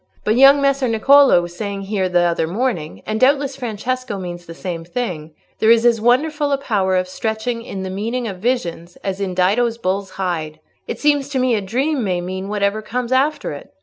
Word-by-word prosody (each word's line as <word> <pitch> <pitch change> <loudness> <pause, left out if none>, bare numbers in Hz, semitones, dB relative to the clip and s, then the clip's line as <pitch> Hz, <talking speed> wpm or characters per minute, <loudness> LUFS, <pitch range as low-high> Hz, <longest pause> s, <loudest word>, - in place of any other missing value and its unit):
But 215 - +2
young 275 +2 +7
Messer 275 -1 +2
Niccolò 250 -2 +5
was 175 0 -8
saying 200 0 -4
here 195 -2 -1
the 175 -1 +3
other 170 -2 +1
morning—and 215 0 -3
doubtless 275 +1 +2
Francesco 250 -1 -3
means 175 -2 -7
the 165 - -9
same 170 -3 -5
thing—there 175 0 -3
is 230 0 +5
as 230 -2 +4
wonderful 290 +5 +2
a 280 - +2
power 195 -8 0
of 185 0 +1
stretching 220 +4 -3
in 195 -4 -6
the 190 - -4
meaning 230 +5 -3
of 190 -3 -6
visions 180 -7 -2
as 195 0 -3
in 185 -2 -2
Dido's 225 +6 +2
bull's 195 -2 -2
hide. 165 -5 -3 0.3
It - - -4
seems 290 -2 +2
to 280 - -2
me 255 -1 +2
a 215 - +1
dream 260 +7 -1
may 185 -3 0
mean 185 +2 -5
whatever 205 0 0
comes 240 +3 -4
after 280 +4 +1
it. - - -10
215 Hz, 195 wpm, -19 LUFS, 185-255 Hz, 0.3 s, young